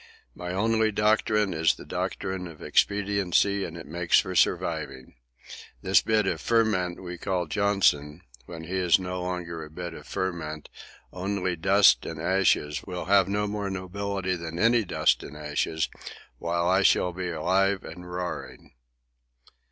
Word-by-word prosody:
My 90 +5 -6
only 110 +3 +1
doctrine 105 -1 +2
is 80 0 +2
the - - -12
doctrine 95 -1 -3
of 80 -3 -12
expediency, 100 -1 +1
and 85 -2 -6
it 80 - -9
makes 85 +3 +2
for 95 - -3
surviving. 65 -6 0 0.7
This - - +4
bit 110 -2 +1
of - - -1
the - - -12
ferment 105 -7 +1
we 90 -1 -7
call 90 -2 -1
'Johnson,' 85 -5 +1 0.3
when 80 -1 -8
he 90 +3 -3
is 90 -3 +4
no 90 -1 -4
longer 90 -2 -4
a 75 - -10
bit 85 +2 -6
of - - -11
the - - -16
ferment, 80 -5 -4 0.4
only 95 -1 -2
dust 95 -7 +5
and 80 -1 -6
ashes, 85 -4 +1
will 90 -2 -5
have 100 -1 +4
no 105 +1 0
more 105 -1 -3
nobility 95 0 -3
than 85 -1 -6
any 115 +4 +4
dust 95 - +1
and 75 - -9
ashes, 75 +1 -1 0.5
while 85 0 -1
I 95 +2 +4
shall 90 -2 +3
still 90 +1 -6
be 90 - -2
alive 95 +4 +1
and 90 +1 -10
roaring." 80 -8 -6
90 Hz, 160 wpm, -26 LUFS, 85-100 Hz, 0.7 s, dust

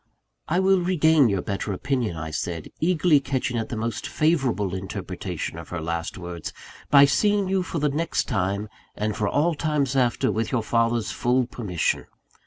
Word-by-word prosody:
"I 175 +3 +1
will 190 -1 +4
regain 160 -6 +4
your 100 -3 0
better 100 0 -3
opinion," 120 -4 -1
I 80 0 -5
said, 85 +1 -4
eagerly 165 -2 +4
catching 130 -2 -2
at 110 - -4
the - - -3
most 115 +1 -3
favourable 130 - +1
interpretation 95 0 -5
of - - -10
her 85 - -4
last 85 +1 -3
words, 85 -3 -6 0.4
"by 140 -1 +8
seeing 205 +6 +2
you 190 0 +1
for 180 - -4
the 150 -1 +2
next 155 +4 0
time, 100 -2 -1 0.3
and 105 0 -2
for 105 -2 0
all 165 +4 +2
times 145 -4 0
after, 125 -4 +2
with 110 0 -2
your 120 -4 0
father's 115 0 +1
full 125 +1 +1
permission. 105 -8 -2
120 Hz, 175 wpm, -24 LUFS, 100-155 Hz, 0.4 s, by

